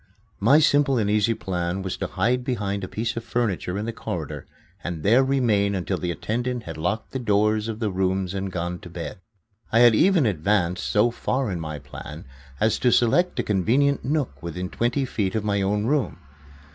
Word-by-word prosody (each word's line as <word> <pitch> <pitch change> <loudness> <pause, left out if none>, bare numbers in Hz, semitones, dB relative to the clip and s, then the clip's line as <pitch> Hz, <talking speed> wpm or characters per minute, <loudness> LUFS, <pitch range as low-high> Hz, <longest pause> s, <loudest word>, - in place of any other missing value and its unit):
My 130 +8 +5
simple 145 -3 +4
and 105 -3 +1
easy 105 +2 +2
plan 90 0 -3
was 95 - -3
to - - -3
hide 125 +2 0
behind 100 -6 -2
a - - -3
piece 115 +5 -3
of 115 - -4
furniture 100 -7 -1
in 105 - -3
the 115 - -3
corridor - - -5 0.4
and 85 -3 -4
there 120 +6 +5
remain 115 -7 +2
until 95 0 -2
the 90 - -2
attendant 120 +7 -2
had 80 - -7
locked 95 +8 -2
the 130 - -3
doors 105 -1 +2
of 110 -2 -4
the 110 -3 -1
rooms 95 0 0
and 95 0 -3
gone 85 0 -3
to 85 - -11
bed. 85 +1 -6 0.5
I 115 - +5
had 120 -1 +7
even 175 - +4
advanced 90 -2 0
so 105 +3 +3
far 130 0 -1
in 90 - -3
my 75 -2 -5
plan 70 - -9 0.3
as 110 0 +2
to 125 - +3
select 175 +12 +3
a - - +2
convenient 125 +8 +2
nook 135 - -2
within 90 +3 -5
twenty 120 +4 0
feet 100 -6 -2
of 110 - 0
my 100 -1 0
own 105 +2 0
room. 145 +2 0
105 Hz, 195 wpm, -24 LUFS, 95-120 Hz, 0.5 s, had